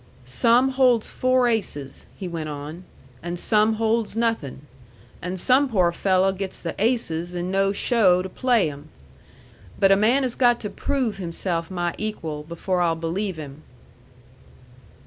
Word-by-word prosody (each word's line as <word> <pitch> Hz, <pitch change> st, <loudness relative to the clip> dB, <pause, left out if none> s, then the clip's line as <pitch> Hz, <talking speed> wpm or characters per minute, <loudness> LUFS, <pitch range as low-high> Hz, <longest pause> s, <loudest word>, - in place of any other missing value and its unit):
"Some 235 Hz, -, +3 dB
holds 255 Hz, -4 st, +2 dB
four 255 Hz, -1 st, +2 dB
aces," 150 Hz, -, -2 dB
he 190 Hz, -, -6 dB
went 165 Hz, -3 st, -5 dB
on, 150 Hz, +5 st, -7 dB, 0.4 s
"and 175 Hz, +1 st, -4 dB
some 215 Hz, +4 st, +3 dB
holds 225 Hz, 0 st, 0 dB
nothin', 225 Hz, -, -1 dB, 0.6 s
and 180 Hz, +1 st, -4 dB
some 260 Hz, +8 st, +3 dB
poor 185 Hz, -7 st, +2 dB
fello' 190 Hz, +2 st, +2 dB
gets 190 Hz, 0 st, -5 dB
the 165 Hz, -, -5 dB
aces 180 Hz, -7 st, 0 dB
and 175 Hz, +1 st, -3 dB
no 195 Hz, 0 st, +2 dB
show 195 Hz, -4 st, +3 dB
to -, -, -4 dB
play 230 Hz, -, +1 dB
'em; 145 Hz, +2 st, -12 dB, 0.9 s
but 195 Hz, -, +5 dB
a -, -, +7 dB
man 230 Hz, +7 st, +3 dB
has 250 Hz, -2 st, -1 dB
got 240 Hz, -2 st, +3 dB
to 210 Hz, -, -4 dB
prove 255 Hz, -7 st, -2 dB
himself 170 Hz, -2 st, -3 dB
my 175 Hz, -2 st, -2 dB
equal 165 Hz, -8 st, -4 dB
before 170 Hz, +3 st, -2 dB
I'll 165 Hz, -2 st, +2 dB
believe 175 Hz, +4 st, -3 dB
him." 145 Hz, -1 st, -9 dB
190 Hz, 150 wpm, -23 LUFS, 170-230 Hz, 0.9 s, a